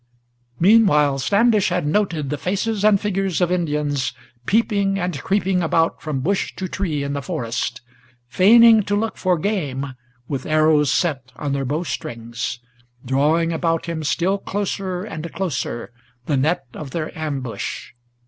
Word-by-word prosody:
Meanwhile 165 -9 +5
Standish 205 - +3
had 180 -2 -1
noted 155 -4 0
the 150 - -1
faces 200 +4 -1
and 210 -2 +5
figures 195 -3 -1
of 180 -1 +1
Indians 150 -5 -1 0.3
Peeping 200 -3 +2
and 180 -6 -2
creeping 190 -2 +1
about 165 0 +1
from 150 -4 -3
bush 195 +7 -1
to 190 - -4
tree 165 -6 -2
in 140 0 -3
the 140 - -2
forest, 115 -2 -3 0.5
Feigning 220 - +7
to 205 - 0
look 220 +2 -1
for 185 -2 +1
game, 145 -8 -2 0.3
with 135 -3 -4
arrows 155 -2 +3
set 135 -8 -1
on 140 +3 -3
their 135 -1 -1
bow 150 +6 -1
strings, 115 -6 -5 0.5
Drawing 155 +6 +2
about 165 0 0
him 165 -2 -4
still 175 +8 0
closer 190 -2 -3
and 170 -6 -6
closer 130 -10 -3 0.3
the 145 - 0
net 140 +2 +1
of 150 - -7
their 155 +2 -4
ambush. 140 -6 -4
165 Hz, 150 wpm, -21 LUFS, 140-195 Hz, 0.5 s, Feigning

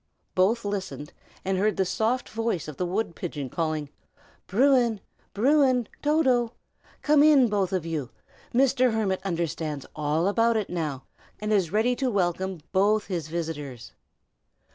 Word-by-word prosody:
Both 205 +5 +2
listened, 185 -8 -4 0.3
and 190 0 0
heard 210 +2 +1
the 190 - +2
soft 220 +8 0
voice 225 -8 -2
of 150 - -8
the 180 - -1
wood 185 -1 -2
pigeon 145 -7 -5
calling, 155 -3 -2 0.6
"Bruin! 240 0 +3 0.4
Bruin! 255 0 +3
Toto! 260 -6 +2 0.5
come 295 -1 +5
in, 290 -5 +6
both 200 -3 0
of 185 -4 -1
you. 155 -7 -3 0.4
Mr. 255 -1 +3
Hermit 195 -4 0
understands 165 -5 -3
all 155 +3 0
about 230 +2 +3
it 210 - -3
now, 150 -6 -3 0.4
and 210 0 -1
is 190 -6 +2
ready 225 +4 +2
to 265 -2 0
welcome 190 -3 -1
both 205 +3 +2
his 170 -6 -3
visitors." 150 -7 -5
195 Hz, 140 wpm, -26 LUFS, 165-235 Hz, 0.6 s, in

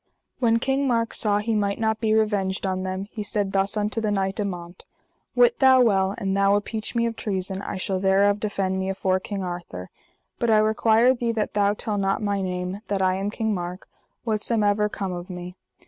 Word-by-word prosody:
When 230 -3 +3
King 270 +3 0
Mark 230 -2 0
saw 205 -2 +1
he 215 +2 -1
might 200 -2 0
not 220 -1 0
be 220 -1 +2
revenged 205 -3 0
on 185 -1 -1
them, 190 +1 -3
he 220 - -5
said 205 -2 -2
thus 195 +2 0
unto 210 +2 -1
the 215 - 0
knight, 195 0 -1
Amant: 175 -3 -5 0.5
Wit 485 -1 +4
thou 265 -1 +6
well, 195 -4 +2
an 195 -4 -1
thou 200 0 +3
appeach 215 +3 -3
me 235 0 +2
of 230 -1 -2
treason 190 -2 -3
I - - -5
shall 190 0 -2
thereof 200 +2 +3
defend 195 -3 -1
me 190 0 -2
afore 190 -1 0
King 195 0 -5
Arthur; 175 - -6 0.5
but 235 - +1
I 220 - +5
require 220 +3 +4
thee 240 -2 -1
that 215 -2 -2
thou 205 0 +2
tell 210 -1 -3
not 195 0 +1
my 205 -2 -1
name, 180 +1 -3
that 195 -1 0
I 185 0 +3
am 195 +1 -2
King 220 0 -1
Mark, 180 0 -5 0.4
whatsomever 210 -2 +1
come 195 -2 -4
of 175 +2 -7
me. 180 0 -7
205 Hz, 205 wpm, -24 LUFS, 190-220 Hz, 0.5 s, thou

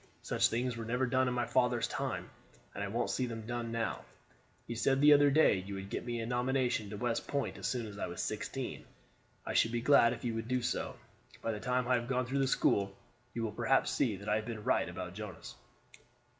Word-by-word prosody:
Such - - +3
things 120 +1 -1
were 115 - -5
never 125 +3 0
done 130 0 +2
in 125 - 0
my 120 -1 +1
father's 125 -2 +2
time, - - -3 0.4
and - - -4
I - - -2
won't - - -1
see 130 - 0
them 115 -2 -6
done 120 0 -3
now. 115 -1 -2 0.6
You 120 - -5
said 135 +4 +2
the 150 +1 +8
other 145 0 +6
day 140 -9 +5
you 100 +2 -6
would 95 0 -7
get - - -2
me 120 -1 -2
a 115 - -2
nomination 125 -2 0
to 105 - -6
West 115 +1 -1
Point 140 -2 -1
as - - -2
soon 125 -3 -1
as 105 -1 -8
I - - -2
was 85 - -7
sixteen. - - -4 0.6
I - - -3
should 115 - +3
be 120 - 0
glad 120 -2 +6
if 120 - -9
you 120 -2 -1
would 115 0 -4
do 125 -1 0
so. - - -2 0.5
By 115 - 0
the 105 - -4
time 125 +1 0
I 130 - +3
have 120 -1 +1
gone 130 -1 0
through 135 +3 -1
the 135 - +2
school, 100 -6 +2 0.4
you 115 - -1
will 110 - -1
perhaps 120 +4 +2
see 115 -6 +1
that 100 +2 -10
I 105 - +3
have 110 - -4
been 110 -3 -5
right 90 - +2
about 90 0 -6
Jonas." 105 -3 -8
120 Hz, 240 wpm, -33 LUFS, 110-125 Hz, 0.6 s, the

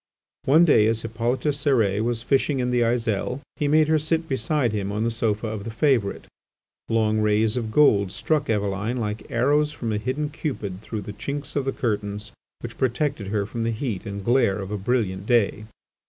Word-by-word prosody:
One 155 +6 +6
day 110 -9 +5
as 115 0 0
Hippolyte 115 +3 -1
Cérès 115 -8 +1
was 120 -1 -1
fishing 135 +2 +1
in 125 -1 0
the 125 -1 +2
Aiselle, 115 +1 0 0.2
he 150 - 0
made 155 +1 +4
her 155 0 +3
sit 160 +2 -1
beside 130 -1 0
him 100 -2 -2
on 105 +2 -1
the 115 - 0
Sofa 110 -1 -1
of 110 -2 -4
the 115 - -5
Favourite. 115 -3 +1 0.6
Long 110 -1 +2
rays 105 +1 +2
of 115 -3 -2
gold 105 -9 +4
struck 150 +3 -1
Eveline 105 +2 -1
like 105 -2 -4
arrows 145 +5 +2
from 120 -7 -3
a 105 - 0
hidden 140 +6 -2
Cupid 105 - -4
through 110 -1 -5
the 105 +1 -7
chinks 140 +7 -5
of 140 -2 0
the 135 - 0
curtains 105 -3 -3 0.3
which - - -8
protected 130 -3 0
her 100 0 -1
from 115 +3 -5
the 115 - 0
heat 115 -3 -3
and 100 -1 -6
glare 120 -5 +3
of 95 0 -6
a - - -1
brilliant 100 -3 -1
day. 110 -3 +2
115 Hz, 195 wpm, -24 LUFS, 105-135 Hz, 0.6 s, One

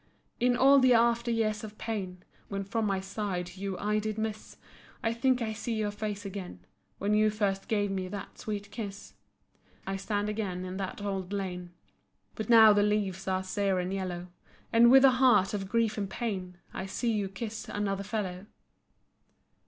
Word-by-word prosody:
In 245 0 +3
all 275 +2 +7
the 255 -2 +5
after 235 +1 +3
years 220 -2 0
of 215 0 -8
pain, 190 -6 -4 0.2
When 195 0 -3
from 215 +2 -1
my 195 -1 0
side 190 -3 -4
you 195 -1 -4
I 210 +1 0
did 215 0 -3
miss, 220 -1 -4 0.5
I 225 - +1
think 250 +1 +2
I 220 -1 -2
see 225 +2 -3
your 210 -1 -1
face 205 -1 -4
again, 185 - -7 0.3
When 205 +2 0
you 215 0 +4
first 200 -2 -1
gave 205 -2 0
me 190 -1 -2
that 200 +1 -8
sweet 205 -1 -5
kiss. 200 -1 -7 0.7
I 195 0 -2
stand 205 +1 -1
again 200 -4 -3
in 185 +1 -5
that 195 +1 -5
old 195 -2 -3
lane. 180 -3 -4 0.6
But 220 0 -5
now 220 -2 +9
the 205 - +3
leaves 200 -3 0
are 190 0 0
sere 195 0 0
and 180 +1 -2
yellow, 180 -2 -4 0.4
And 235 +1 +7
with 265 +2 +8
a 265 - +8
heart 215 -7 +5
of 195 -2 -3
grief 225 -1 +1
and 200 -2 -2
pain, 190 -5 -4 0.2
I 190 - -4
see 230 +4 -1
you 205 -3 -1
kiss 215 +3 -6
another 200 -1 -2
fellow. 200 -2 -4
205 Hz, 180 wpm, -29 LUFS, 190-220 Hz, 0.7 s, now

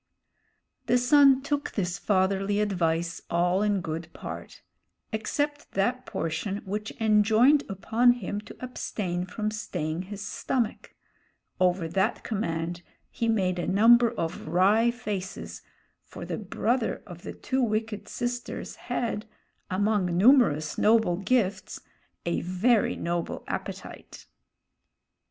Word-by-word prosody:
The 245 - +4
son 270 +1 +5
took 290 0 -2
this 180 -3 -2
fatherly 195 +1 +1
advice 170 -5 0
all 175 +3 +2
in 205 -2 +1
good 160 0 -4
part, - - -8 0.5
except 290 +7 -2
that 245 +6 0
portion 165 +5 -3
which 210 +3 -4
enjoined 220 +6 +4
upon 225 +5 +3
him 205 -3 -4
to 210 - -12
abstain 185 -7 -3
from 215 +3 -3
staying 175 -6 -3
his 205 0 -6
stomach; 240 -5 -2 0.6
over 180 -2 +2
that 190 +6 0
command 175 -5 -2 0.3
he 230 - -2
made 185 -5 +1
a - - -2
number 235 +4 +6
of 170 -10 -4
wry 200 +8 +4
faces, 210 -6 -5 0.4
for - - -9
the - - -4
brother 225 +4 -1
of 175 -2 -11
the - - -7
two 265 0 -2
wicked 220 -2 -1
sisters 245 0 -4
had, 225 -2 -3 0.4
among 200 0 +1
numerous 190 - +4
noble 215 -5 +4
gifts, 195 -2 0 0.5
a 170 - 0
very 200 +6 +2
noble 170 0 -3
appetite. - - -7
205 Hz, 120 wpm, -27 LUFS, 180-235 Hz, 0.6 s, number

